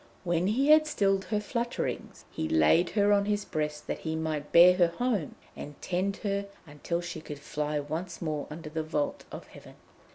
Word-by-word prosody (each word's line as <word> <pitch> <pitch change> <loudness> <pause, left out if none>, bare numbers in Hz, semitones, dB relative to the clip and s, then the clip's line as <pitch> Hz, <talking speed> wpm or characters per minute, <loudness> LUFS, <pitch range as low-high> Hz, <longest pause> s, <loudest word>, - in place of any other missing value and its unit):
When 175 0 +1
he 265 +8 +1
had 310 0 +7
stilled 195 -8 +1
her 210 - -1
flutterings, 235 +3 -4
he 80 - -3
laid 80 - +4
her 205 0 +4
on 200 0 +3
his 205 0 -1
breast, 150 -1 -3
that - - -4
he 160 0 -3
might 155 -2 -3
bear 175 +2 +8
her 175 -2 +5
home 205 - -2 0.2
and 145 0 -9
tend 190 +2 -1
her 200 0 -1 0.2
until 160 +3 -4
she 175 -2 -6
could 150 -2 -8
fly 150 +1 -3
once 160 +5 -5
more 155 -3 -3
under 155 0 -8
the 160 0 -2
vault 155 -2 -2
of - - -8
heaven. - - -14
170 Hz, 190 wpm, -29 LUFS, 150-200 Hz, 0.2 s, bear